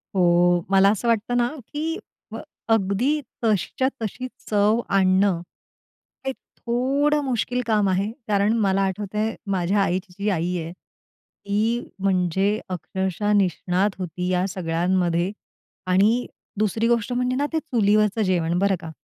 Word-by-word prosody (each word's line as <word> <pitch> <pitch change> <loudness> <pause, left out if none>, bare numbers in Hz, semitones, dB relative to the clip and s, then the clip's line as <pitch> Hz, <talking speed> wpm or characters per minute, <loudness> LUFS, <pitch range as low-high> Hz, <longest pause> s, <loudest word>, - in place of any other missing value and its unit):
हो. 175 -1 +4
मला 195 0 +6
असं 220 +3 -2
वाटतं 230 +1 +1
ना, 240 0 +3 0.3
की 320 +3 -2 0.4
अ, - - -4 0.4
अगदी 225 +8 +1 0.2
तशीच्या 220 +4 +1
तशी 235 +4 -4 0.2
चव 210 +2 +3
आणणं, 190 -2 +3 0.8
ते 265 - 0 0.3
थोडं 275 +5 +1
मुश्किल 250 -1 -1
काम 210 -3 +2
आहे, 195 +3 0 0.2
कारण 205 +1 +2
मला 195 0 +2
आठवतंय 210 +3 -2 0.2
माझ्या 190 +2 +1
आईची 185 0 -2
जी 205 +1 0
आई 180 -1 -1
आहे, 165 +1 -6
ती 210 +4 -4 0.2
म्हणजे 190 +2 +1
अक्षरशः 190 +3 -2
निष्णात 190 0 +1
होती 180 0 -4
या 180 0 +1
सगळ्यांमध्ये 175 0 0 0.6
आणि 205 +7 +3 0.3
दुसरी 215 +2 +1
गोष्ट 235 0 +1
म्हणजे 250 +1 0
ना, 285 +2 +1
ते 320 - +2
चुलीवरचं 215 -6 +2
जेवण 175 -3 +1
बरं 200 0 +2
का. 165 -2 -7
200 Hz, 130 wpm, -23 LUFS, 185-225 Hz, 0.8 s, मला